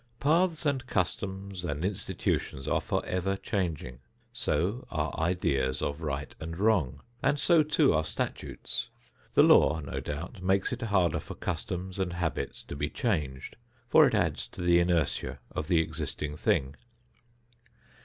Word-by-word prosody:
Paths 160 +2 +2
and 135 -3 0
customs 95 0 -2
and 80 0 -2
institutions 90 -8 -2
are - - +2
forever 90 +2 -1
changing. 80 - -3 0.3
So 95 - -1
are 80 0 -2
ideas 70 -6 +1
of 75 +2 -2
right 75 -2 -3
and 80 +1 -6
wrong, 95 - +2 0.2
and 145 - +2
so, 165 +2 +5
too, 150 - +3
are 80 0 +2
statutes. 75 - -3 0.5
The - - +8
law, 75 +3 +6
no 70 - -4
doubt, 85 +8 -6
makes 95 +6 +1
it 125 - -5
harder 95 -8 +2
for - - -8
customs 95 +1 -4
and 90 -2 -1
habits 85 -2 -3
to - - -7
be 70 +1 -1
changed, 75 - -2 0.3
for - - +7
it - - +1
adds - - 0
to - - -7
the 85 0 +5
inertia 85 -4 +1
of 75 - -3
the 85 - +3
existing 75 -2 -3
thing. 70 -2 +1
90 Hz, 145 wpm, -29 LUFS, 75-100 Hz, 0.5 s, The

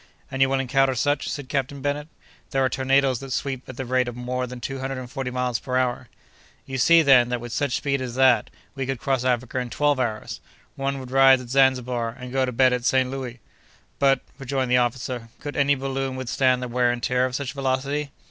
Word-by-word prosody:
"And 135 - -3
you 135 - +5
will 135 0 +1
encounter 135 0 +2
such," 145 +3 0
said 145 -3 -5
Captain 135 +1 -2
Bennet. 145 +2 -2 0.4
"There 135 -1 +1
are - - +2
tornadoes 135 0 +2
that 135 -1 -8
sweep 130 -1 -3
at 130 - -8
the 130 - -4
rate 125 0 +1
of 120 - -5
more 125 +1 -3
than 125 0 -8
two 135 +3 -5
hundred 135 0 -3
and 130 -1 -6
forty 135 -3 -3
miles 125 -1 -1
per 130 -1 -2
hour." 125 -1 -1 0.6
"You 135 -1 -4
see, 165 +4 +6
then, 130 -4 +6
that 125 -1 -1
with 120 0 -7
such 140 -3 0
speed 140 -2 -1
as 125 -2 -5
that, 130 -4 +4 0.2
we 135 -2 -4
could 135 -2 -2
cross 135 -2 0
Africa 125 0 0
in 125 -1 -4
twelve 145 +1 +1
hours. 110 -4 -3 0.3
One 135 0 -2
would 130 -1 -9
rise 135 0 +6
at 125 -2 -10
Zanzibar, 125 -3 +1
and 125 0 -8
go 135 -1 +2
to - - -2
bed 130 +1 +4
at 125 -1 -2
St. 130 0 +2
Louis!" 130 -2 -6 0.6
"But," 135 -2 +3 0.2
rejoined 135 -1 -2
the 125 - +5
officer, 120 -1 -2
"could 145 0 -6
any 140 0 +3
balloon 135 0 -3
withstand 130 0 +1
the - - -3
wear 120 0 +2
and 120 -1 -5
tear 125 0 +2
of 125 - -6
such 140 -1 -3
velocity?" 140 +2 -1
130 Hz, 225 wpm, -24 LUFS, 125-135 Hz, 0.6 s, see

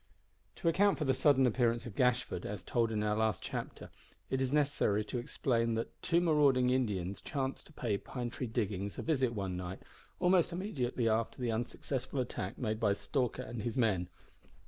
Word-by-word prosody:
To - - -3
account 190 +1 +4
for 150 - -1
the 135 - +3
sudden 135 -3 +4
appearance 120 -1 +2
of 120 - -7
Gashford, 125 -6 +1
as 100 -3 -5
told 115 0 +1
in 105 -1 0
our 105 0 +1
last 110 0 0
chapter, - - -5 0.4
it 130 - +1
is 130 -1 0
necessary 140 -8 +2
to 120 - -3
explain 115 -3 0
that 115 - -4
two 170 -1 +3
marauding 145 -7 +4
Indians 100 -7 -1
chanced 135 -2 -3
to 155 - -17
pay 110 -8 -1
Pine 120 -2 -5
Tree 125 - -4
Diggings 100 -3 -2
a - - -3
visit 130 -7 +1
one 95 -3 -2
night, 90 +1 -6 0.4
almost 180 -1 +4
immediately 135 - -1
after 110 +2 0
the 120 -2 0
unsuccessful 130 +4 -3
attack 125 - -3
made 110 -3 -2
by 105 -3 +3
Stalker 125 +3 -1
and 115 0 -5
his 120 +4 -3
men. 95 -7 +2
120 Hz, 185 wpm, -33 LUFS, 110-135 Hz, 0.4 s, account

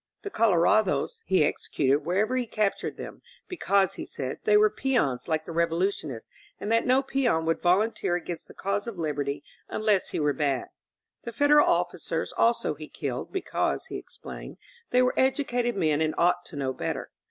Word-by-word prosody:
The 405 - -5
color 205 - +3
ados 215 - +2
he 185 -5 +4
executed 140 -1 +1
wherever 200 +10 0
he 250 -2 -1
captured 215 -2 -1
them; - - -8 0.3
because, 200 - +1
he - - -6
said, 130 -1 -5
they 210 0 +5
were 210 0 +5
peons 230 - 0
like 160 -1 -1
the - - -7
Revolution 170 +1 0
ists 115 -4 -8 0.3
and 210 - -3
that 230 +2 +2
no 260 +2 +4
peon 250 -12 +1
would 165 0 0
volunteer 190 0 +2
against 175 -1 -5
the - - -14
cause 200 +3 -2
of 230 -5 -6
liberty 145 -3 -2 0.3
unless 215 -3 +1
he - - -3
were 150 -1 +2
bad. 140 -4 -1 0.5
The 235 - -5
Federal 290 +4 +5
of - - +2
ficers - - -4
also 235 -7 +2
he 155 +1 -10
killed, 130 -4 -4
because, 380 - -1
he - - -6
explained, - - -10 0.3
they 250 0 +4
were 250 - +2
educated 250 -3 +1
men 155 -4 +2
and 155 0 0
ought 175 +1 +2
to 165 - -10
know 135 -2 -2
better. - - -4
190 Hz, 185 wpm, -27 LUFS, 155-235 Hz, 0.5 s, they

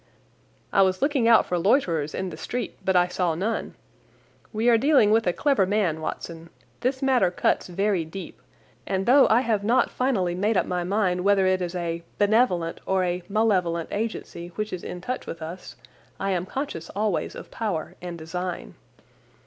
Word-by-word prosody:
"I 195 - +5
was 185 -1 +2
looking 280 -5 +2
out 230 -1 +6
for 180 - -1
loiterers 170 - +1
in 185 -1 -3
the - - -7
street, 245 0 -4
but 190 - +1
I 175 0 +5
saw 180 -2 -1
none. 210 +7 -2 0.8
We 220 +2 -1
are 240 - +6
dealing 250 -3 +4
with 225 -2 +3
a - - +4
clever 270 -2 +2
man, 185 -6 0
Watson. 165 +1 -6 0.3
This 260 +2 -1
matter 255 -9 +3
cuts 175 - 0
very 190 0 0
deep, 175 +5 -9 0.5
and 190 0 -1
though 270 +3 +6
I 225 +3 +5
have 220 -5 0
not 240 +4 +2
finally 215 -9 0
made 205 +4 +1
up - - +2
my 180 -1 -2
mind 185 -1 0
whether 200 -1 +4
it 185 0 +2
is 175 0 -3
a 170 -1 -3 0.2
benevolent 205 -6 +2
or 190 -1 +2
a 180 0 -1
malevolent 185 -6 +1
agency 210 -5 -4
which 215 -1 -3
is 180 - -5
in 180 - -6
touch 255 +7 -4
with 165 - -6
us, 160 -5 -8 0.4
I 195 0 -1
am 180 -1 -1
conscious 260 - -5
always 205 -2 -1
of - - -10
power 200 -9 -3
and 175 -1 -6
design. 170 - -5
190 Hz, 180 wpm, -25 LUFS, 175-225 Hz, 0.8 s, out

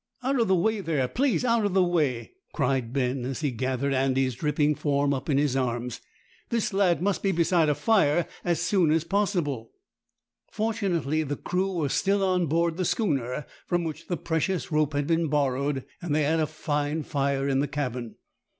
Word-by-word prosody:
"Out 265 +1 +1
of 230 - +2
the 190 - +4
way 215 +4 +1
there, 150 -8 0
please! 255 - +1
out 230 -2 +2
of 200 -2 0
the 190 - +5
way!" 150 -9 0 0.2
cried 130 -5 0
Ben, 130 -1 -1
as 135 +3 -4
he 145 -3 0
gathered 130 +3 -1
Andy's 130 -1 +1
dripping 150 +3 +1
form 140 -1 +1
up 135 +3 -4
in 140 - +3
his 140 -2 +1
arms. 120 -2 -2 0.5
"This 230 -4 -1
lad 180 -5 +2
must 200 -1 0
be 195 - +1
beside 170 -2 +2
a 150 - +2
fire 170 -1 +3 0.2
as 170 -3 0
soon 175 -1 +2
as 160 0 +2
possible." 170 - -1 0.8
Fortunately 185 -9 -1
the 145 -2 -2
crew 190 +2 -1
were 160 -5 -1
still 200 +6 +1
on 180 -2 +2
board 165 +2 +1
the 185 - 0
schooner 140 - -1 0.2
from 175 -1 +1
which 160 -2 -6
the 175 - -1
precious 170 +2 -1
rope 150 -1 +1
had 145 0 0
been 165 +1 +1
borrowed, 140 -1 0 0.2
and 165 -4 -1
they 155 - +2
had 160 +3 +2
a 155 - +1
fine 150 0 -2
fire 140 -1 -1
in 135 -1 +1
the 145 - +1
cabin. 125 -5 -4
150 Hz, 190 wpm, -26 LUFS, 135-180 Hz, 0.8 s, the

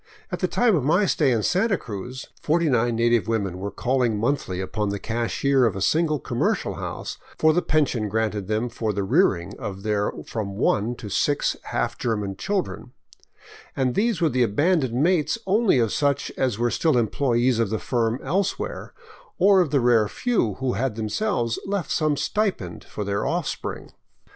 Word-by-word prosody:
At - - -3
the - - +1
time 240 -5 +3
of 150 - 0
my 175 +9 +3
stay 150 -6 +2
in 115 -3 +1
Santa 195 +2 +2
Cruz, 120 +3 -7 0.2
49 135 -8 +2
native 115 -1 +2
women 100 -5 -1
were 100 +2 -3
calling 120 +1 0
monthly 115 -5 -1
upon 105 +2 -2
the 100 - -2
cashier 120 +5 0
of 105 - -2
a - - -3
single 155 - +2
commercial 120 -2 -1
house - - -5 0.2
for 155 0 +4
the 175 - +2
pension 130 -11 +1
granted 105 -2 -1
them 110 +3 0
for 115 -2 -3
the 100 0 -1
rearing 95 0 +2
of 100 -5 -6
their 105 -1 0
from 100 -3 -4
one 110 +2 +1
to 115 - -9
six 145 +8 +1
half - - -2
German 105 -4 -2
children; 180 - -3 0.8
and 130 -2 +1
these 220 - +1
were 165 - +4
the 130 -3 0
abandoned 130 - +2
mates 160 - +2
only 205 - +3
of 115 -4 +1
such 145 -1 0
as 125 -6 0
were 120 0 +1
still 160 -6 +2
employees 120 +1 +1
of 115 -3 +1
the 110 - -1
firm 115 +1 -1
elsewhere, 195 +1 -2 0.4
or 195 +1 +5
of 170 - 0
the 140 - +2
rare 120 -3 +4
few 165 - 0
who 130 -2 -1
had 130 -3 -1
themselves 115 - -1
left 195 -6 -2
some 155 -2 +1
stipend 195 - -2
for 105 - -6
their 100 +1 -1
offspring. 170 -3 -3
120 Hz, 175 wpm, -24 LUFS, 110-155 Hz, 0.8 s, or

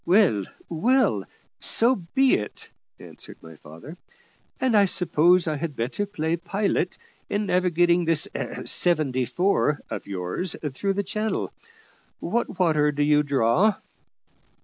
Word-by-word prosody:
"Well, 175 - +3 0.2
well, 250 +11 +1 0.3
so 240 +3 +3
be 255 +9 +1
it," 105 - -3 0.3
answered - - -10
my 80 0 -12
father; 85 - -12 0.6
"and 255 -4 +1
I 205 -1 +6
suppose 180 -1 +3
I 155 -1 -1
had 155 -1 -4
better 130 - -2
play 165 -4 -2
pilot 190 +1 -1 0.3
in 205 +1 -1
navigating 175 -2 +2
this 165 -2 +1
`seventy 140 -8 0
four' 175 -5 +1
of - - -5
yours 95 - -3 0.2
through 195 +9 -1
the 200 +1 -1
channel. 215 +3 -3 0.7
What 235 -5 -2
water 155 -5 +3
do 145 0 0
you 150 0 +4
draw?" 145 - +2
170 Hz, 125 wpm, -24 LUFS, 150-200 Hz, 0.7 s, I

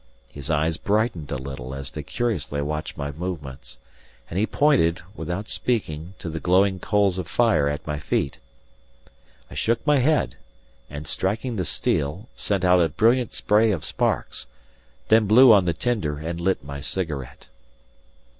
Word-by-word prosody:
His 70 -1 -9
eyes 80 +1 +1
brightened 105 - -1
a - - -1
little 65 -1 -6
as 70 0 -7
they 75 - -5
curiously 110 - -2
watched 75 +2 -3
my 70 0 -3
movements, 70 -7 -6 0.5
and 90 - -1
he 110 - +2
pointed 125 - +2
without 90 +4 -4
speaking 90 -7 -2
to 90 - -7
the 80 0 -4
glowing 95 +2 +3
coals 100 -3 +1
of 90 - -4
fire 115 -12 +3
at 75 - -4
my 75 -1 -3
feet. 70 -3 -1 1.1
I - - -8
shook 115 +1 0
my 150 -2 +4
head, 150 +4 +1 0.5
and 75 +1 -7
striking 110 - -1
the 95 -4 -1
steel, 80 - -1
sent 95 -3 -1
out 90 0 +5
a 80 - +3
brilliant 120 +1 +2
spray 110 +2 +3
of 85 -7 -2
sparks, - - -1 0.6
then 110 -1 +5
blew 120 +3 +8
on 100 -3 +5
the 85 - +2
tinder 80 -4 -1
and 85 +3 -5
lit 95 -4 0
my 70 0 -7
cigarette. 70 -4 -4
90 Hz, 160 wpm, -24 LUFS, 75-110 Hz, 1.1 s, blew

